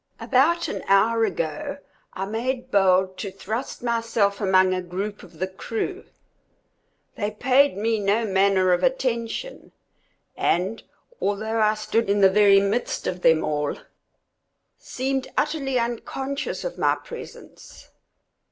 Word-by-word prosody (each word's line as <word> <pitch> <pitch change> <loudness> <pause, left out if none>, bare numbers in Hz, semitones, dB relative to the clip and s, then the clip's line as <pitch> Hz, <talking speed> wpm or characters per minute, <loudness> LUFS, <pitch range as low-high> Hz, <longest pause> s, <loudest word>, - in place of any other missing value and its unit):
About 325 +7 +2
an - - -5
hour 225 +3 +4
ago, 220 - -3 0.4
I 190 - -3
made 250 +5 -3
bold 190 -1 +3
to 200 - -4
thrust 215 +7 -5
myself 230 -4 0
among 190 -1 +4
a 185 - -1
group 195 +4 -5
of 190 - -15
the 185 - -1
crew. 225 - -5 1.1
They 205 -1 -1
paid 255 +3 +3
me 220 +1 0
no 205 +3 +1
manner 190 -2 +3
of 175 - +1
attention, 255 - -2 0.6
and, 190 +6 0 0.4
although 220 +3 -1
I 215 0 +3
stood 215 0 -1
in 205 +1 +2
the 190 -1 +6
very 200 -1 +6
midst 200 +5 -1
of 180 0 -3
them 160 -2 +4
all, 150 -1 -1 1.0
seemed 265 +1 -3
utterly 270 -4 0
unconscious 265 +4 -3
of - - -5
my - - +3
presence. - - -12
215 Hz, 130 wpm, -24 LUFS, 190-245 Hz, 1.1 s, the